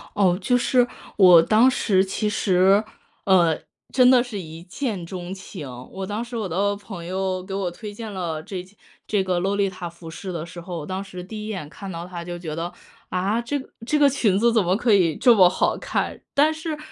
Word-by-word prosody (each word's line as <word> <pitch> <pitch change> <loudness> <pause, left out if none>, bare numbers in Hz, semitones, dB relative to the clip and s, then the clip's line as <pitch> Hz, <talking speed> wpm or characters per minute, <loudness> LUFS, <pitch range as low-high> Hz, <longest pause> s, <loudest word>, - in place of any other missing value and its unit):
哦， 185 -3 +3
就 245 +6 +2
是 245 0 +3 0.3
我 180 -4 +8
当 225 +8 +5
时 195 -7 +2
其 210 +2 -1
实， 195 +1 +3 0.4
呃， 175 -5 +4 0.3
真 250 -1 +5
的 245 -1 +5
是 220 -5 -6
一 160 -1 -9
见 190 -2 -4
钟 180 +1 -6
情， 190 -6 -8 0.2
我 190 0 -5
当 210 +4 -3
时 240 0 -6
我 210 -4 -2
的 200 +4 0
朋 195 -4 -9
友 185 0 -2
给 190 0 -7
我 190 -3 -2
推 210 +3 -8
荐 220 0 -7
了 165 -4 -3
这 185 -1 -6 0.4
这 205 -3 +1
个 185 -2 0
洛丽塔 190 -2 -1
服 170 -1 -12
饰 185 +3 -7
的 165 -1 -4
时 175 0 -9
候， 175 -1 -6
我 150 - -6
当 190 +3 -4
时 180 -2 -8
第 215 +2 -7
一 - - -6
眼 190 -9 -5
看 195 +4 -8
到 170 +1 -6
它 175 -2 -7
就 175 0 -6
觉 160 -3 -6
得， 170 +2 -4 0.4
啊， 195 +6 0
这 285 +5 -2
个 265 - -10 0.2
这 300 +4 +1
个 290 -1 +6
裙 225 -8 +2
子 235 +2 +3
怎 220 -4 +3
么 180 +2 +2
可 230 -2 +2
以 170 -6 +3
这 245 - +6
么 185 -4 +7
好 180 - +1
看。 - - -3
但 300 +3 +4
是 315 -1 -4
190 Hz, 240 characters per minute, -23 LUFS, 175-220 Hz, 0.4 s, 我